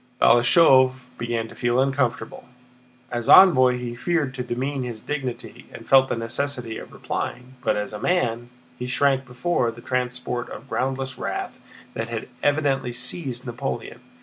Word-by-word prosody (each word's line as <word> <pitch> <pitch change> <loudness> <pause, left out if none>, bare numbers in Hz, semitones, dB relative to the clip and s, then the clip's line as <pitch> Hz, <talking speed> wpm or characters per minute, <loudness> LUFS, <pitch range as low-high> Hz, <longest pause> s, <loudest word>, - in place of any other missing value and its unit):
Balashëv 130 +2 +6 0.3
began 115 -1 -2
to - - -13
feel 120 0 0
uncomfortable: 130 -4 -1 0.7
as 120 -1 -3
envoy 130 -10 +7
he 125 -1 -5
feared 150 0 -1
to 125 - -5
demean 130 +3 -3
his 120 -3 -5
dignity 135 -5 -5
and - - -11
felt 135 0 +5
the - - 0
necessity 120 0 -3
of - - -11
replying; 125 +1 -5
but, - - +2
as 105 +1 -4
a 105 - -5
man, 120 - 0 0.3
he 125 - -4
shrank 135 +1 +1
before 125 0 0
the 115 +1 -9
transport 125 0 -3
of 120 - -10
groundless 130 -1 -2
wrath - - -3 0.4
that 115 +1 -4
had 115 -1 -4
evidently 140 -4 +1
seized 130 +1 -4
Napoleon. 120 -1 -5
125 Hz, 150 wpm, -23 LUFS, 120-135 Hz, 0.7 s, envoy